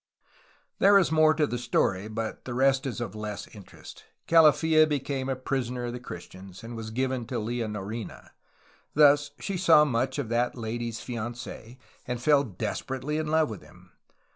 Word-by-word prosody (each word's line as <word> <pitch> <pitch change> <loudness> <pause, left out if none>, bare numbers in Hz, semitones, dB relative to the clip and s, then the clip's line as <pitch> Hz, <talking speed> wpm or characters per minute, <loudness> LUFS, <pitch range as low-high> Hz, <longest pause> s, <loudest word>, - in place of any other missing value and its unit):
There 200 0 +6
is 185 -5 +3
more 155 0 +5
to 150 -1 +2
the 125 -4 -3
story, 100 -4 0
but 110 0 -5
the 120 - -5
rest 135 +1 +2
is 125 - -4
of 120 - -4
less 105 -1 -5
interest. 105 -3 -13 0.2
Calafia 160 -1 +5
became 135 -2 -2
a 135 - 0
prisoner 125 -1 -3
of 120 - -4
the 125 - -5
Christians, 95 -2 -10
and 115 +1 -7
was 110 -1 -6
given 130 0 -2
to 125 - -5
Leonorina. 110 -1 -5 0.6
Thus, 145 -1 +5
she 195 -2 -4
saw 165 -4 +6
much 130 -1 -1
of 135 -6 -3
that 120 +2 0
lady's 115 0 -4
fianc6, 120 0 -7 0.3
and 125 -1 -3
fell 140 +2 +4
desperately 130 - -4
in 155 - -2
love 155 -4 +2
with 105 - -8
him. - - -19
125 Hz, 165 wpm, -27 LUFS, 115-145 Hz, 0.6 s, There